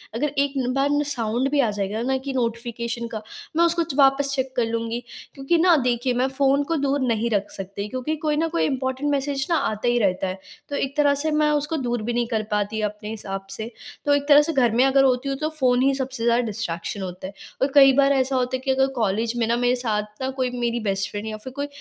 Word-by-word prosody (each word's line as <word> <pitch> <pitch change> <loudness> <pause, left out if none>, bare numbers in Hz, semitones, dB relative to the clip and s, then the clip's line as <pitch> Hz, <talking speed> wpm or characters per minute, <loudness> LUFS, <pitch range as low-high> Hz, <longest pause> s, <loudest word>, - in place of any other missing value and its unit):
अगर 295 +6 0
एक 280 0 +1 0.2
बार 275 +1 +1
ना 290 0 +2
साउंड 235 +2 -1
भी 290 - +2
आ 240 - +3
जाएगा 205 +2 -3
ना 265 +2 0
कि 275 - -2
नोटिफ़िकेशन 235 -1 -3
का 215 - -4 0.3
मैं 340 +1 +5
उसको 340 0 +1 0.2
वापस 275 0 +3
चेक 260 -1 -3
कर 240 -2 +2
लूँगी। 230 +1 -3 0.3
क्योंकि 275 +5 0
ना, 345 +1 +5
देखिए 250 -1 0
मैं 250 +2 +1
फ़ोन 275 +1 +2
को 330 - +1
दूर 280 +1 +1
नहीं 230 0 0
रख 205 -2 0
सकती 200 +2 -6
क्योंकि 260 +6 -2
कोई 300 -1 +1
न 330 - +1
कोई 335 - +1
इम्पोर्टेंट 265 +1 -1
मैसेज 275 0 -1
ना 335 - +3 0.2
आता 215 +3 -3
ही 240 - +3
रहता 190 -3 +1
है। 185 +1 -5 0.3
तो 285 - -3
एक 275 0 -2
तरह 290 -1 +4
से 315 - 0
मैं 300 - +3
उसको 295 +2 0
दूर 240 -1 -1
भी 240 +2 -2
नहीं 240 0 0
कर 215 - 0
पाती 210 +1 -1
अपने 210 0 -9
हिसाब 195 -3 -6
से। 225 +3 -6 0.3
तो 290 - +4
एक 285 0 -2
तरह 295 -1 +8
से, 320 +2 -1
घर 245 -5 +3
में 250 +3 +5
अगर 270 0 +5
होती 260 +1 +2
हूँ 275 - -2
तो 310 +2 -1
फ़ोन 255 -5 +1
ही 275 +1 +3
सबसे 265 -3 -4
ज़्यादा 235 +1 +3
डिस्ट्रैक्शन 195 -2 -4
होता 185 0 -6
है। 195 - -10 0.3
और 265 - +4
कई 270 -2 +8
बार 280 0 +5
ऐसा 265 0 +1
होता 255 0 0
है 255 - -3
कि 265 - +2
अगर 265 0 +3
कॉलेज 225 +1 0
में 230 - +1
ना 235 - +2
मेरे 245 +1 +2
साथ 210 -2 -3
ना 260 - -1
कोई 255 - +1
मेरी 240 0 0
बेस्ट 195 0 -1
फ्रेंड 205 +1 -5
या 215 - -4
फ़िर 250 +4 -9
कोई 285 +1 -3
250 Hz, 250 wpm, -23 LUFS, 225-275 Hz, 0.3 s, तरह